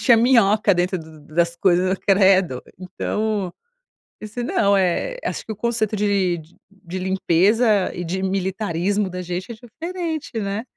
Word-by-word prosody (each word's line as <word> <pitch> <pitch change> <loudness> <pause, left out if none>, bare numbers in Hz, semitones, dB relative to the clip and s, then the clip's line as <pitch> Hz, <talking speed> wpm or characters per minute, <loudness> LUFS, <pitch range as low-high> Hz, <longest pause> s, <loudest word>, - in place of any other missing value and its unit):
Tinha 235 -3 +5
minhoca 220 -4 +4
dentro 180 +1 0 0.2
das 170 +3 -1
coisas. 185 +1 +2
Credo! 190 -8 +4 0.2
Então, 200 +1 -2 0.7
disse: 215 +3 -6
"Não, 200 -4 +2
eh, 195 - 0
acho - - -4
que - - -6
o 215 - -4
conceito 220 -1 -1
de 200 -4 +1 0.5
de 185 +2 -4
limpeza 190 +3 +2
e 175 - -4
de 185 +3 -3
militarismo 190 0 -1
da 180 0 -5
gente 180 +4 -5
é 235 - -7
diferente, 320 - -5
né?". 200 +1 -3
195 Hz, 140 wpm, -21 LUFS, 180-220 Hz, 0.7 s, Tinha